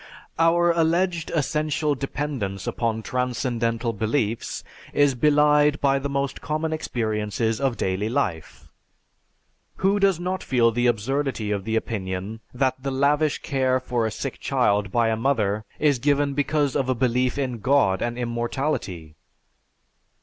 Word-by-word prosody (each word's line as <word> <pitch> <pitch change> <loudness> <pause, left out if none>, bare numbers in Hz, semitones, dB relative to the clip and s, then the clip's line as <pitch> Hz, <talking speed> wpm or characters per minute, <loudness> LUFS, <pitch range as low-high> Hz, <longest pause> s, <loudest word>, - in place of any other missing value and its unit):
"Our 170 +1 +4
alleged 170 +1 +1
essential 150 0 0
dependence 135 - -4
upon 110 -2 -2
transcendental 120 -2 -1
beliefs 110 +1 -2 0.3
is 145 -1 +4
belied 150 +2 +4
by 135 -1 +2
the 140 +1 -3
most 140 0 -2
common 155 +1 -2
experiences 110 -5 -1
of 135 -4 0
daily 95 +3 -1
life. 85 -9 -3 1.1
Who 195 +2 +2
does 195 -4 +3
not 185 +1 -2
feel 120 -3 +2
the 120 +2 +1
absurdity 120 0 -1
of 100 -2 -2
the 110 - -1
opinion 100 -1 -3
that 130 0 0
the 135 - -2
lavish 145 +3 +1
care 130 -3 +1
for 120 -3 -1
a - - -1
sick - - -5
child 105 -1 +1
by 115 0 +2
a 110 - +1
mother 110 -4 0
is 145 -4 +2
given 145 +1 +1
because 145 -1 0
of 130 -1 0
a 130 - +2
belief 125 +1 +1
in 130 -4 -2
God 125 -6 +2
and 120 0 -2
immortality? 120 - -3
130 Hz, 140 wpm, -24 LUFS, 115-145 Hz, 1.1 s, Our